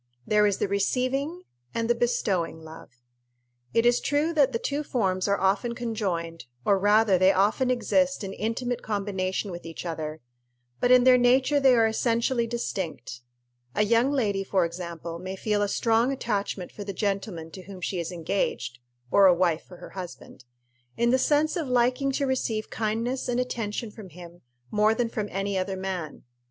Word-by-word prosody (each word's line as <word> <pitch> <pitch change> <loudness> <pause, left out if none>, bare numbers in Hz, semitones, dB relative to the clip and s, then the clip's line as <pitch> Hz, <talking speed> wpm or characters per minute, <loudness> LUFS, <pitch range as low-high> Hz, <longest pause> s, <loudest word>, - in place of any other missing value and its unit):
There 210 0 +4
is 200 - 0
the - - 0
receiving 255 - -1 0.3
and 230 0 0
the 240 - +4
bestowing 195 -9 -1
love. 160 +1 -11 0.8
It 230 - +2
is 240 0 +4
true 295 +3 0
that 285 -4 +4
the 230 - 0
two 285 +5 -2
forms 190 -9 0
are 200 0 +1
often 200 +5 +1
conjoined, 185 -9 -3 0.2
or 200 -1 +3
rather 205 -1 +4
they 185 +1 +6
often 205 +7 +2
exist 270 +1 +1
in 195 0 -5
intimate 235 +4 -2
combination 195 -2 -2
with 175 0 -7
each 165 +2 -8
other; 155 -2 -4 0.6
but 245 - +2
in 250 0 +7
their 255 0 +6
nature 260 +4 +4
they 265 -2 +5
are 230 -1 +4
essentially 235 +2 +1
distinct. 190 - -4 0.5
A 210 - +3
young 230 +4 +3
lady, 205 -8 0
for 190 -2 +1
example, 170 -1 -6
may 185 +2 -5
feel 210 +1 0
a 205 - +2
strong 230 +4 +2
attachment 205 -7 -3
for 205 - -8
the 200 0 -5
gentleman 195 -4 -3
to 185 - -9
whom 195 -2 -9
she 180 +1 -3
is 170 0 -3
engaged 160 -8 -2 0.3
or 200 -1 +7
a 180 - +6
wife 170 -2 +1
for 180 - -13
her - - -11
husband 180 -8 -9 0.5
in 235 0 +3
the 260 - +3
sense 300 +3 +2
of 325 -5 -2
liking 250 +2 +2
to 280 - 0
receive 235 -5 -2
kindness 230 +4 -2
and 245 0 0
attention 230 -3 -3
from 210 -3 -11
him 175 +1 -12 0.3
more 215 +1 +3
than 235 0 0
from 215 -3 -3
any 195 0 -1
other 190 +1 -3
man. 185 -5 -5
210 Hz, 180 wpm, -26 LUFS, 185-245 Hz, 0.8 s, in